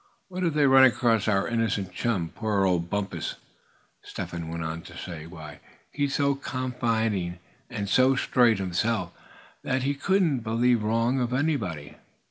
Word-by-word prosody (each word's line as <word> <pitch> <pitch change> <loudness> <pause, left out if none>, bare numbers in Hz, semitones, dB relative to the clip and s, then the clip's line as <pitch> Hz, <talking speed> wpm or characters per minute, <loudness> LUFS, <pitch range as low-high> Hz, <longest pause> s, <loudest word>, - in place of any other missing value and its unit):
"What 185 0 -4
if 165 -4 0
they 150 -1 +4
run 135 -1 +7
across 115 -4 +3
our 100 -2 +2
innocent 115 -5 -1
chum, 95 -9 -1
poor 105 -2 0
old 85 -2 +1
Bumpus?" 100 0 -3 0.7
Step - - -7
Hen 85 -1 -5
went 85 0 -4
on 80 +1 -4
to 85 0 -12
say, 85 -3 -7
"Why, 80 -3 -10 0.3
he's 145 -1 -1
so 140 -1 +2
confiding, 115 -9 -2 0.3
and 105 -5 -4
so 130 +5 +4
straight 120 -4 +3
himself, 95 +1 -1 0.5
that 130 0 -1
he 140 +2 +1
couldn't 170 -2 +1
believe 115 +1 +1
wrong 115 +4 +1
of 125 0 -1
anybody. 120 - -2
115 Hz, 155 wpm, -26 LUFS, 90-130 Hz, 0.7 s, run